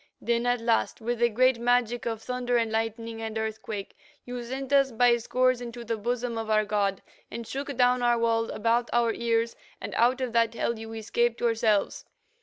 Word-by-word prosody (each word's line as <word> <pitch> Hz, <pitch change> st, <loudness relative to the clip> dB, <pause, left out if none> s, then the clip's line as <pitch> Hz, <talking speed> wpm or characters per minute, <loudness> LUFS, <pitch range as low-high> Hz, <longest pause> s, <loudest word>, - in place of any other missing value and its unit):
Then, 235 Hz, 0 st, 0 dB
at 245 Hz, -1 st, +1 dB
last, 230 Hz, -1 st, +1 dB
with 235 Hz, +1 st, -3 dB
a 235 Hz, -, +5 dB
great 255 Hz, +2 st, +3 dB
magic 240 Hz, 0 st, +1 dB
of 225 Hz, -1 st, -3 dB
thunder 250 Hz, -1 st, -1 dB
and 230 Hz, -2 st, 0 dB
lightning 225 Hz, 0 st, -3 dB
and 220 Hz, 0 st, -4 dB
earthquake, 220 Hz, -2 st, -5 dB, 0.3 s
you 245 Hz, -1 st, -5 dB
sent 265 Hz, +3 st, -5 dB
us 275 Hz, -1 st, +4 dB
by 240 Hz, +1 st, +4 dB
scores 255 Hz, +1 st, +1 dB
into 240 Hz, 0 st, -7 dB
the 230 Hz, 0 st, -1 dB
bosom 235 Hz, +1 st, -2 dB
of 225 Hz, -1 st, -5 dB
our 215 Hz, 0 st, +3 dB
god, 200 Hz, -2 st, 0 dB, 0.3 s
and 235 Hz, -, -6 dB
shook 275 Hz, +2 st, -5 dB
down 250 Hz, 0 st, +3 dB
our 240 Hz, -1 st, +3 dB
walls 230 Hz, -1 st, +1 dB
about 235 Hz, +2 st, 0 dB
our 235 Hz, -1 st, +2 dB
ears 230 Hz, 0 st, 0 dB, 0.2 s
and -, -, -6 dB
out 245 Hz, +3 st, +3 dB
of 255 Hz, -3 st, -3 dB
that 230 Hz, 0 st, +2 dB
hell 235 Hz, -1 st, -1 dB
you 225 Hz, 0 st, -8 dB
escaped 230 Hz, +2 st, 0 dB
yourselves. 225 Hz, -3 st, +1 dB
235 Hz, 195 wpm, -27 LUFS, 225-245 Hz, 0.3 s, a